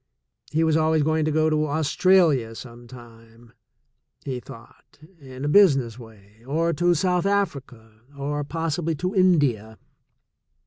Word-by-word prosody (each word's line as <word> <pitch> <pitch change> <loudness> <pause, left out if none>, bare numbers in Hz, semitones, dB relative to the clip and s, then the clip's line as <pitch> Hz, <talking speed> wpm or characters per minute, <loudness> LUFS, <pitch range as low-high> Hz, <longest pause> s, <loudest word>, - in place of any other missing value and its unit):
He 160 +1 +1
was 160 -1 +2
always 160 -1 +2
going 155 +1 0
to 155 0 +1
Australia 150 -4 +2
sometime, 120 -1 -14 0.7
he 130 -2 -4
thought, 125 -2 -16 0.2
in 130 -1 -9
a - - -1
business 135 - +3
way, 110 -1 -17
or 165 +4 0
to 175 0 +1
South 180 +2 0
Africa, 130 - -4 0.2
or 145 +1 -3
possibly 165 +2 -3
to 180 +5 -3
India. 145 - +1
145 Hz, 120 wpm, -23 LUFS, 120-165 Hz, 0.7 s, business